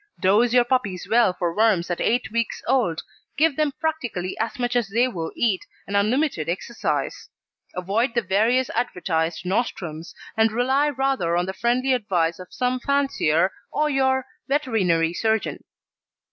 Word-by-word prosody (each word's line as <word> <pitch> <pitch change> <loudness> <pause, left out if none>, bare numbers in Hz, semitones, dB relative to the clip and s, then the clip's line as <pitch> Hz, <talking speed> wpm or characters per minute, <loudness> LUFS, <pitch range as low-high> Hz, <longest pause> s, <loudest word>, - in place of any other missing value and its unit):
Dose 210 +5 +3
your 245 0 +5
puppies 240 -8 -1
well 230 -3 +4
for 175 -2 -3
worms 205 -5 +2
at 175 - -2
eight 245 0 +1
weeks 230 0 -2
old, 230 -11 +1 0.3
give 310 -1 +3
them 305 -1 +1
practically 250 - -2
as 225 +5 -2
much 245 0 -1
as 240 -4 +1
they 235 +5 +2
will 170 -9 -4
eat, 210 -6 +1 0.2
and 200 - -4
unlimited 215 - +1
exercise. 190 +7 -3 0.5
Avoid 215 +7 0
the 235 - +2
various 225 +7 +2
advertised 175 -8 -1
nostrums, 175 -6 -3 0.2
and 220 0 +3
rely 265 +6 +2
rather 265 -11 0
on 175 - +1
the 190 - -4
friendly 250 +5 +1
advice 180 -8 0
of 180 - -11
some 250 0 -1
fancier 245 - +1 0.2
or 300 0 +1
your 265 -1 +2 0.2
veterinary 195 - +1
surgeon. 220 +3 -1
225 Hz, 150 wpm, -23 LUFS, 180-255 Hz, 0.5 s, your